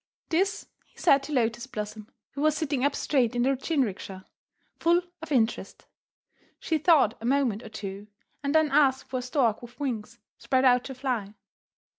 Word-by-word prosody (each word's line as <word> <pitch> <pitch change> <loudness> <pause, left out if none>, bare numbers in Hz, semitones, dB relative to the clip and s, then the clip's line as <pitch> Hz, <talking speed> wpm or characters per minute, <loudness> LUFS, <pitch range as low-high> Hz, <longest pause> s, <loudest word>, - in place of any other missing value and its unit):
This 390 +5 0 0.2
he - - -32
said 280 -5 +4
to 275 - -8
Lotus 235 -2 0
Blossom, 215 -2 -6 0.2
who 280 - -6
was 305 0 +2
sitting 285 -4 -1
up 285 0 +2
straight 250 -5 +1
in 240 - +2
the 260 - +3
jinrikisha, 225 - -2 0.5
full 345 +1 +3 0.2
of 325 -1 -9
interest. 235 -4 0 0.7
She 320 -2 -1
thought 300 - +4
a - - -6
moment 250 -5 +1
or 225 - -10
two, 200 -1 -7 0.3
and 280 +2 -1
then 315 -2 +4
asked 270 -2 +3
for 255 - -1
a - - -4
stork 245 -3 0
with 240 0 -13
wings 235 -5 -4 0.2
spread 260 0 +1
out 250 -1 +4
to 265 - -7
fly. 240 -6 -3
260 Hz, 175 wpm, -27 LUFS, 225-290 Hz, 0.7 s, said